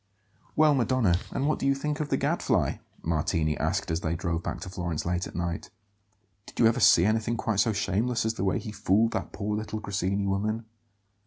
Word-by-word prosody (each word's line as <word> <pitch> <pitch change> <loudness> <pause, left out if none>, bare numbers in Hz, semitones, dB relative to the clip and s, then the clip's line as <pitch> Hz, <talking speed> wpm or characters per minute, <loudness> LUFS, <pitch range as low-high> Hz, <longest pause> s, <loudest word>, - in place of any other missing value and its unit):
"Well, 155 -1 +5
Madonna, 120 -8 +2
and 135 - -2
what 155 - +1
do - - 0
you 140 - +3
think 150 +2 -3
of 150 -1 -2
the - - +2
Gadfly?" - - +1 0.3
Martini 80 -1 0
asked - - -1
as 80 - 0
they 80 +1 -1
drove 85 -1 -2
back - - -4
to - - -6
Florence 85 -4 -3
late 90 +1 -1
at - - -12
night. 85 -1 -3 0.8
"Did - - -13
you 115 - +6
ever 115 +2 +4
see 90 -6 +6
anything 110 +2 +1
quite 110 -3 -1
so 115 - +3
shameless 110 +4 0
as 110 - +1
the 95 - -4
way 95 - +1
he 110 - -5
fooled 105 +2 +2
that 95 - -3
poor 105 +1 -3
little 110 0 -4
Grassini 100 -1 -1
woman?" 105 +4 -1
105 Hz, 210 wpm, -27 LUFS, 90-115 Hz, 0.8 s, you